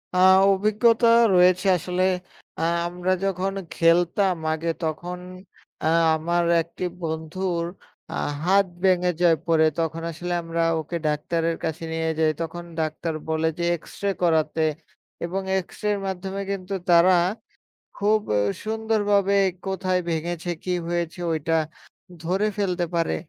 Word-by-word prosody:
আ - - +2 0.3
অভিজ্ঞতা 215 +4 +3 0.3
রয়েছে 180 +1 +4
আসলে 180 +2 -1 0.6
আ - - -2 0.3
আমরা 180 +1 -2
যখন 195 0 -1 0.2
খেলতাম 175 +3 +3 0.2
আগে, 160 +1 -3
তখন 175 +3 -3 0.6
আ - - -1 0.3
আমার 170 +2 0 0.2
একটি 170 +2 -8 0.2
বন্ধুর 170 +2 -2 0.5
আ - - -5 0.3
হাত 195 +3 +4 0.2
ভেঙে 180 -1 +3
যায় 170 -2 +5
পরে, 160 -1 +4
তখন 165 0 -2
আসলে 175 +2 -4
আমরা 165 0 -2 0.2
ওকে 160 +2 -4
ডাক্তারের 165 +2 0
কাছে 160 +1 -3
নিয়ে 160 0 -1
যাই 160 -1 +3
তখন 170 +1 -5 0.2
ডাক্তার 160 +1 -2
বলে 160 0 0
যে - - -1
এক্সরে 200 +4 -4
করাতে, 160 -1 +2 0.6
এবং 185 +3 -3 0.2
এক্সরের 205 +2 -3
মাধ্যমে 190 +1 -4
কিন্তু 195 0 -4 0.2
তারা 175 +2 +6 0.8
খুব 210 +1 +2 0.4
সুন্দরভাবে 210 -3 +1 0.3
কোথায় 185 -1 0
ভেঙেছে 170 +2 -3
কি 185 - -3 0.2
হয়েছে 170 0 -2
ওইটা 160 +1 -1 0.7
ধরে 185 +5 0
ফেলতে 180 -3 0
পারে। 165 -1 +1
175 Hz, 125 wpm, -24 LUFS, 165-190 Hz, 0.8 s, তারা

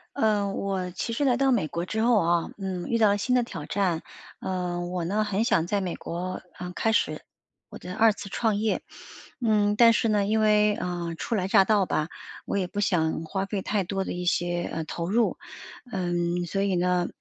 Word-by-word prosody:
呃， 215 -6 +2
我 190 -2 -2
其 185 +6 -4
实 260 +5 0
来 255 -3 +4
到 270 +1 +2
美 205 -11 +2
国 170 +2 -3
之 220 +4 -2
后 235 0 +4
啊， 170 0 +1
嗯， 190 -3 -4
遇 235 - +1
到 220 -2 +5
了 200 - +2
新 250 +5 +1
的 245 - +3
挑 165 -10 -7
战， 185 -5 0 0.4
呃， 180 -2 -2
我 175 0 -3
呢 205 +5 0
很 210 +1 0
想 165 -7 +2
在 200 +2 0
美 180 -2 -2
国， 180 +2 -5 0.2
嗯， 180 0 -6
开 225 +4 +1
始 - - +1 0.5
我 - - -10
的 180 - -8
二 225 -1 +5
次 200 - -8
创 220 +1 0
业。 215 +1 0 0.6
嗯， 210 -2 +3
但 230 +1 +7
是 230 - +1
呢 210 -2 +2
因 215 +2 +1
为， 210 -1 +4
呃， 175 -3 -3
初 235 - -2
来 190 -2 -1
乍 195 - +6
到 205 -2 +3
吧， 155 -3 -1 0.4
我 - - -3
也 190 - +1
不 190 +3 -5
想 165 -6 +1
花 190 +4 -2
费 195 0 -3
太 205 +1 0
多 195 +1 -2
的 - - -3
一 180 0 -4
些， 175 0 0
呃， 160 -1 -3
投 170 +2 -4
入， 230 +3 +2 0.5
嗯， 175 -1 -1
所 195 +3 -2
以 195 -2 +1
呢， 180 0 +1
195 Hz, 230 characters per minute, -26 LUFS, 175-215 Hz, 0.6 s, 但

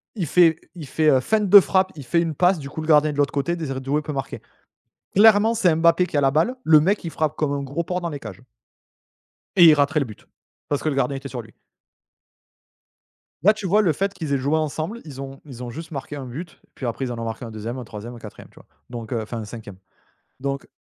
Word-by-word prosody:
il 190 -6 -2
fait 165 +1 +5 0.2
il 160 -5 -8
fait, 155 +3 +2
heu, 135 -3 +5
feinte 210 - 0
de 200 +2 +11
frappe, 190 0 +1
il 145 -4 -9
fait 170 +7 +2
une 165 -2 -2
passe 180 +2 +3
du 140 -1 -7
coup 160 - -6
le 155 - -6
gardien 155 -1 +5
de 145 - -7
l'autre 145 -1 +1
côté, 145 +5 -1
Désiré 135 -5 -4
Doué 140 +3 -1
peut 150 0 -6
marquer. 135 -2 -5 0.7
Clairement 220 +2 +6
c'est 190 -7 +3
Mbappé 170 +2 +4
qui 150 - -3
a - - +3
la 135 -1 +3
balle, 160 - +1
le 155 -1 +6
mec 195 +7 +1
il 165 - -5
frappe 155 -2 -1
comme 150 -2 -1
un 140 - -2
gros 140 +5 -3
porc 180 +2 -3
dans 170 - -3
les 145 -3 -6
cages. 110 -4 -10 1.1
Et 180 - +7
il 160 - +9
raterait 145 +1 +2
le 140 - 0
but, 110 -4 -13 0.4
parce 145 - -2
que 155 - +1
le 145 - -2
gardien 140 0 0
était 140 +1 -8
sur 125 -2 -5
lui. 110 -1 -18 1.9
Là, 210 +4 +6
tu 215 -3 -5
vois 205 +4 +4
le 175 -7 +2
fait 195 +6 -2
qu'ils 155 -6 -4
aient - - +3
joué 140 +4 0
ensemble 155 +8 -3
ils 135 -3 -8
ont 135 0 -9
ils 125 -4 -9
ont 120 - -6
juste 160 +7 -8
marqué 145 0 -6
1 140 -2 -6
but 150 +7 -8
puis 130 - -7
après 120 +3 -3
ils 125 - -4
en 120 - -5
ont 115 - -4
marqué 115 +2 -5
un 115 - -8
2e, 110 +3 -6
un 125 - -6
3e, 115 +1 -9
un - - -11
4e 105 -2 -12
tu - - -27
vois? - - -17 0.2
Donc 120 -1 -6
heu, 115 - -1
enfin 110 +2 -6
un 110 - -6
5e 105 -3 -10 0.6
donc 140 0 -4
145 Hz, 260 wpm, -22 LUFS, 130-170 Hz, 1.9 s, de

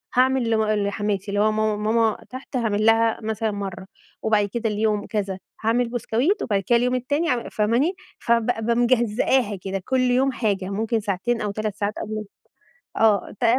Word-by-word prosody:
هاعمل 255 -1 +3
لم 220 -1 +2
لحماتي 205 -1 -1
اللي 205 - 0
هو 215 +1 +3
ماما 215 0 +1 0.2
ماما 225 -2 +2
تحت 260 +2 -9
هاعمل 215 -3 0
لها 225 0 +4
مثلًا 220 0 -2
مرّه، 195 -2 -5 0.4
وبعد 215 -2 +2
كده 235 -1 -1
اليوم 210 0 0
كذا 195 -3 -3 0.2
هاعمل 230 +2 +2
بسكويت، 250 - 0
وبعد 200 -4 0
كده 240 - +5
اليوم 250 +1 +1
التاني 285 +7 0
أع 245 -2 -1
فاهماني، 235 - +1 0.2
فب 230 -1 +2
بابقى 235 -1 0
مجزئاها 240 -1 +2
كده 195 0 -3
كل 260 -1 +1
يوم 255 +2 +2
حاجة، 205 -6 -1
ممكن 220 +3 -1
ساعتين 210 +3 -1
أو 205 -1 -1
3 215 -1 -3
ساعات 205 0 -2
قبل 215 0 -4 0.7
آه، 215 -3 +3
ت 240 - +1
220 Hz, 170 wpm, -23 LUFS, 210-240 Hz, 0.7 s, كده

